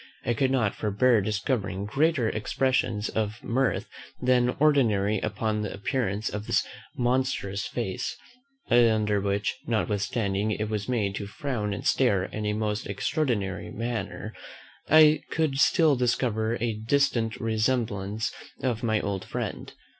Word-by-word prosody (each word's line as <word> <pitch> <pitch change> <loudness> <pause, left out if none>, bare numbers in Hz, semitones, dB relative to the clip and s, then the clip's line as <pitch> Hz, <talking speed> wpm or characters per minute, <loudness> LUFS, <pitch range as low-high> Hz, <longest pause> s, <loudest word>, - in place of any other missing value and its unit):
I 120 - +2
could 130 +3 +1
not 120 -6 +1
forbear 110 +2 +2
discovering 100 -1 -1
greater 135 +2 +2
expressions 115 0 0
of 110 +1 -3
mirth 130 +1 0 0.3
than 125 -1 +2
ordinary 110 -9 +3
upon 110 +1 -1
the 105 - -3
appearance 105 -1 -2
of 105 +1 -4
this - - +2 0.3
monstrous 120 -6 0
face, 120 +1 -3 0.5
under 110 -4 +4
which, 100 +1 -1
notwithstanding 105 0 0
it 105 +1 -3
was 105 0 -3
made 105 -6 0
to 100 - -5
frown 105 -1 -3
and 100 - -5
stare 105 -8 +3
in 105 +2 -4
a 105 - +1
most 105 0 -2
extraordinary 100 - -1
manner, 110 -1 -4 0.6
I 155 -1 +7
could 155 -4 0
still 155 0 +5
discover 120 -2 0
a 115 -1 0
distant 115 0 +1
resemblance 110 -2 -1 0.3
of 120 -4 0
my 110 -2 +1
old 100 -2 -3
friend. - - -5
110 Hz, 130 wpm, -27 LUFS, 105-125 Hz, 0.6 s, I